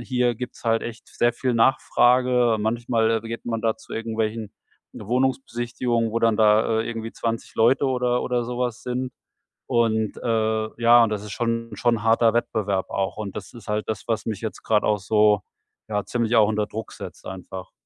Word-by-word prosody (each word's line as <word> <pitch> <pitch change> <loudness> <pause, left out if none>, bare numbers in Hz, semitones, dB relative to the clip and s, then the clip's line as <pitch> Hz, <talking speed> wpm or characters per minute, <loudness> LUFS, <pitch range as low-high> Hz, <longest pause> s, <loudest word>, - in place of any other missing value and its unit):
hier 125 -1 0
gibt's 125 +1 -8
halt 115 0 +2
echt 120 0 -7
sehr 120 0 +1
viel 125 0 -1
Nachfrage. 125 0 +3
Manchmal 115 0 +1
geht 115 0 -6
man 115 -1 -2
da 110 0 0
zu - - -14
irgendwelchen 110 -1 -2 0.4
Wohnungsbesichtigungen, 120 -1 -1
wo 115 - 0
dann 115 -2 +2
da, 110 +1 +4
äh, 115 - -3
irgendwie 115 -1 -5
20 115 -1 -4
Leute 125 +5 +4
oder 125 -1 +1
oder 125 -1 0
so 125 +1 -5
was 120 -2 -2
sind. 125 +1 -3 0.6
Und, 110 -2 +1
äh 110 -2 0
ja, 120 0 +7
und 115 - +2
das 105 -1 -3
ist 105 - -8
schon 115 0 -2
schon 115 -3 +1
harter 115 0 +4
Wettbewerb 100 -5 -1
auch. 95 -2 -2
Und 105 -3 -5
das - - -8
ist 115 -3 -13
halt 105 0 -1
das, 110 - -3
was 110 -2 -1
mich 110 -3 -3
jetzt 110 -4 -5
grad 105 -2 +2
auch 105 - +2
so 105 0 +3 0.5
ja, 105 -1 -1
ziemlich 120 -1 0
auch 110 -2 +6
unter 105 -1 0
Druck 110 +1 -6
setzt - - -10
einfach. 95 0 -8
115 Hz, 185 wpm, -24 LUFS, 110-120 Hz, 0.6 s, ja